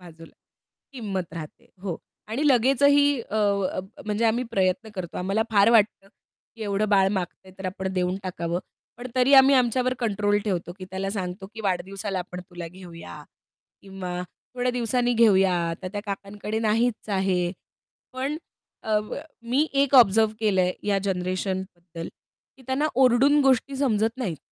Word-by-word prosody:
बाजूला 165 -2 -14 0.6
किंमत 195 - -4
राहते. 155 -2 -9 0.2
हो. 180 -5 -3 0.3
आणि 245 +7 -2
लगेचही 275 +3 +5 0.2
अ, 220 - -5
अ, 200 -3 +1 0.3
म्हणजे 210 +2 0
आम्ही 235 +3 +2
प्रयत्न 190 +1 0
करतो. 180 -3 -6
आम्हाला 195 +4 0
फार 205 +1 +5
वाटतं, 210 -3 +3 0.5
की 225 - -7
एवढं 205 0 0
बाळ 195 -2 +4
मागतंय 185 0 -5
तर 190 - -9
आपण 190 +1 -4
देऊन 180 0 0
टाकावं. 175 -2 -3 0.4
पण 245 +2 -7
तरी 255 +2 +3
आम्ही 270 +1 +8
आमच्यावर 255 0 +2
कंट्रोल 205 -2 +1
ठेवतो, 180 -4 -2
की 185 - -7
त्याला 190 +1 -3
सांगतो, 190 -1 -4
की 225 - -7
वाढदिवसाला 195 0 -2
आपण 180 0 -6
तुला 175 -1 -7
घेऊया 170 - -11 0.6
किंवा 185 -2 -5 0.3
थोड्या 250 0 0
दिवसांनी 245 0 +1
घेऊया. 195 -5 +5 0.2
आता 185 +3 -5
त्या 205 - -3
काकांकडे 205 +2 -4
नाहीच 225 +1 0
आहे. 180 -2 +1 0.6
पण 270 +4 -2 0.6
अ, 210 - +5 0.4
मी 260 +6 +1
एक 280 0 +2
ऑब्झर्व्ह 220 -3 +6
केलंय 190 -4 +2 0.2
या 200 -1 +3
जनरेशनबद्दल, 185 -2 -3 0.5
की 265 - -18
त्यांना 265 +3 +1 0.2
ओरडून 265 +4 +5
गोष्टी 270 0 +2
समजत 225 -4 +1
नाहीत. 195 -11 -2
200 Hz, 145 wpm, -25 LUFS, 185-235 Hz, 0.6 s, आम्ही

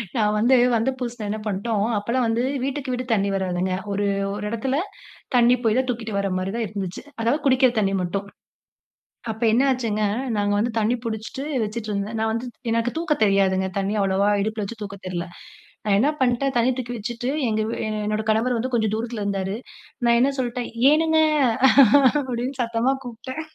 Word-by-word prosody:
நான் 210 -2 +2
வந்து, 240 +5 +4 0.2
வந்த 230 +3 +1
புதுசுல 240 -3 -4
என்ன 215 +1 -2
பண்ட்டோம், 205 +1 -1
அப்பல்லாம் 235 +5 0
வந்து 225 +2 0 0.2
வீட்டுக்கு 275 0 -3
வீடு 250 +1 -3
தண்ணீ 200 -2 +1
வராதுங்க. 185 -1 -1 0.2
ஒரு 205 +1 0 0.3
ஒரு 210 0 -5
இடத்தில 230 +4 -1 0.6
தண்ணி 245 0 +5
போய் 225 +1 +3
தான் 260 0 +1
தூக்கிட்டு 225 -4 -3
வர்றமாரி 190 -1 -1
தான் 235 -1 -1
இருந்துச்சு, 190 -3 -5 0.2
அதாவது 235 +6 +1
குடிக்கிற 260 -2 +4
தண்ணி 195 -2 +1
மட்டும். 195 +3 -3 1.0
அப்ப 220 +1 -10
என்ன 250 - +4
ஆச்சுங்க, 225 -4 -1 0.3
நாங்க 205 0 +1
வந்து 230 +2 0
தண்ணி 220 +3 +2
பிடிச்சிட்டு 225 +5 -4 0.2
வச்சிட்டு 215 +1 -5
இருந்தேன். 205 +2 -3
நான் 220 0 +1
வந்து 230 +2 -3 0.3
எனக்கு 230 +1 0
தூக்க 335 -2 +1
தெரியாதுங்க. 190 -1 +2
தண்ணி 195 +2 -1
அவ்வளவா 195 +1 +2
இடுப்பில 215 0 -2
வச்சு 220 +2 -8
தூக்க 200 -1 -7
தெர்ல. 175 -1 -3 0.6
நான் 205 -2 +3
என்ன 260 +8 +3
பண்டேன் 260 +2 +1
தண்ணி 240 +2 +3
தூக்கி 245 -1 -4
வச்சிட்டு, 240 +3 -4 0.2
எங்க 215 0 0
வீ 225 - -3
எ - - -2 0.2
என்னோட 215 +1 -1
கணவர் 230 +3 +2
வந்து 255 +3 -2
கொஞ்சம் 220 -3 +1
தூரத்தில 230 0 -4
இருந்தாரு. 195 -1 -2 0.5
நான் 235 0 +4
என்ன 260 +3 +4
சொல்ட்டேன், 245 -1 -2 0.2
ஏனுங்க 320 +1 +3 1.0
அப்பிடினு 255 -1 -3
சத்தமா 235 +2 +1
கூப்பிட்டேன். 250 +4 -7
225 Hz, 175 wpm, -23 LUFS, 205-245 Hz, 1.0 s, தண்ணி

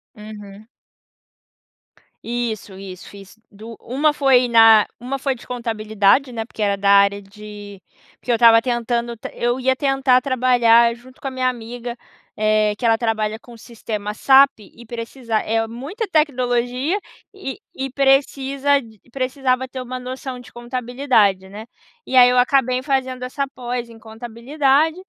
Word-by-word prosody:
Uhum. 210 -1 -12 1.6
Isso, 230 -4 -4
isso, 185 -2 -10
fiz 200 +1 -14
dua 220 +3 -11
uma 290 +5 0
foi 265 -4 +3
na 225 -2 +6
uma 260 +3 -5
foi 270 0 -1
de 240 - -15
contabilidade, 225 +1 0
né, 225 -1 -4
porque 225 - -10
era 200 -1 +1
da 200 0 0
área 200 0 +4
de 205 0 -12 0.4
porque 245 - -4
eu - - +3
estava 230 -1 +6
tentando 240 0 -2 0.2
eu 240 +2 -1
ia 260 0 +1
tentar 270 -2 +2
trabalhar 240 -3 +3
junto 255 +2 -18
com - - -6
a 270 - -4
minha 255 0 0
amiga, 240 0 -7 0.4
eh, 215 0 +2
que 245 - -4
ela 225 -1 +4
trabalha 220 -2 -1
com 240 0 -15
sistema 215 -3 -6
SAP 270 +3 +5
e 215 +3 -15
precisa 230 0 -6
é 225 +1 -1
muita 285 - -6
tecnologia, 255 0 0 0.4
e 390 -10 -7 0.2
e 265 0 -4
precisa, 275 +1 +2
d 220 -5 -15
precisava 260 0 -1
ter 255 0 -7
uma 255 0 -6
noção 255 0 -7
de 245 - -14
contabilidade, 240 -5 0
né. 210 +2 -9 0.4
E - - -3
aí 250 -1 +8
eu 250 - +1
acabei 255 0 +2
fazendo 260 -2 -2
essa 275 +2 -3
pós 245 -1 -5
em 230 -1 -14
contabilidade 265 +7 0
240 Hz, 150 wpm, -20 LUFS, 220-260 Hz, 1.6 s, aí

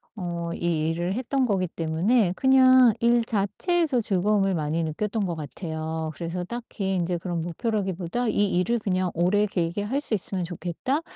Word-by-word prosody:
어 175 -4 -4 0.2
이 160 -2 0
일을 175 +3 -1
했던 260 +3 0
거기 190 -5 0
때문에 175 +6 +1
그냥 260 -2 +6
일 235 0 +3
자체에서 255 - 0
즐거움을 195 -1 +1
많이 155 +1 -1
느꼈던 205 +7 -2
것 175 -2 -2
같아요. 160 +2 -4
그래서 175 +1 -4
딱히 200 -3 -4
인제 175 0 0
그런 170 -1 -3
목표라기보다 195 +3 -2
'이 205 -2 +2
일을 235 +5 +1
그냥 185 -3 -1
오래 185 +5 +2
길게 180 0 -2
할 265 +7 -1
수 240 - -3
있으면 185 -1 -3
좋겠다.' 180 - -3
190 Hz, 340 characters per minute, -25 LUFS, 170-230 Hz, 0.2 s, 그냥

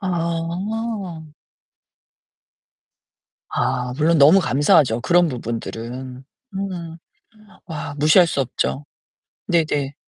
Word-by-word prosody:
아. 180 +2 -3 2.3
아 125 -1 -1
물론 160 +2 +3
너무 155 +8 +7
감사하죠 140 -4 +3
그런 175 +5 +3
부분들은. 125 +1 -6 0.3
음. 180 -4 -5 0.7
와 150 -3 -6
무시할 155 +5 +5
수 150 - -1
없죠. 135 +2 -2 0.6
네네. 150 -5 0
160 Hz, 155 characters per minute, -21 LUFS, 130-175 Hz, 2.3 s, 너무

